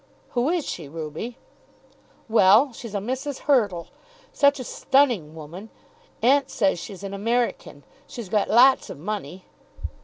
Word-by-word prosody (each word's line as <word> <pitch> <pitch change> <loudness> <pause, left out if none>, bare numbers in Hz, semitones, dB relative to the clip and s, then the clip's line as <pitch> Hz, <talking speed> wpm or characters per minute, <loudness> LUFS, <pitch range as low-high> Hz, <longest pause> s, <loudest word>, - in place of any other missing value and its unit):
"Who 245 +3 0
is 345 -3 -1
she, 155 -5 -6
Ruby?" 160 - -6 0.9
"Well; 225 +4 +5
she's 225 -2 -8
a - - +2
Mrs. 260 +7 -4
Hurtle. 210 - +1 0.4
Such 280 -1 +3
a - - -4
stunning 245 - +1
woman! 170 +7 -10 0.5
Aunt 275 +3 +4
says 195 -6 +1
she's 195 +1 -9
an 195 0 -6
American. 230 +4 -2 0.2
She's 235 -5 -8
got 210 0 +1
lots 255 +4 +5
of - - -8
money." 185 0 -6
220 Hz, 140 wpm, -24 LUFS, 185-260 Hz, 0.9 s, Well